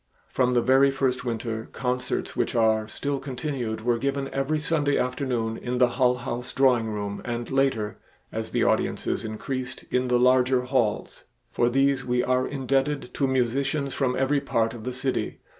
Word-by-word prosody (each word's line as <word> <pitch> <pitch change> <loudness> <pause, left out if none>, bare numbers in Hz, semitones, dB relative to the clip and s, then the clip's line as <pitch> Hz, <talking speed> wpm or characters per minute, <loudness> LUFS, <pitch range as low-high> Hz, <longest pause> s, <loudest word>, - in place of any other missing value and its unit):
From 125 -1 +1
the 120 - +3
very 135 +3 +5
first 130 -2 0
winter, 115 -2 -3
concerts 125 -1 -2
which - - -1
are 110 -2 +3
still 140 +4 -3
continued 130 -4 -4
were 120 +1 +1
given 140 +1 -2
every 135 +3 0
Sunday 150 -2 +1
afternoon 125 -3 -1
in 125 0 -3
the 125 -1 +4
Hull 125 0 +2
House 125 0 -5
drawing 125 -4 +3
room 100 -1 -4
and 120 0 -4
later, 135 -6 0 0.3
as 110 0 -4
the - - +1
audiences - - 0
increased, 125 +4 -5
in 125 0 +1
the 125 0 +3
larger 125 0 +4
halls. 125 -5 -1 0.3
For 120 - +2
these 135 +1 +2
we 125 0 +1
are 130 0 +1
indebted 135 0 -1
to 140 - +1
musicians 135 +2 0
from 130 -2 0
every 135 +2 +1
part 115 -5 0
of 115 -2 -9
the 125 - -3
city. 130 +1 -2
125 Hz, 170 wpm, -26 LUFS, 120-135 Hz, 0.3 s, very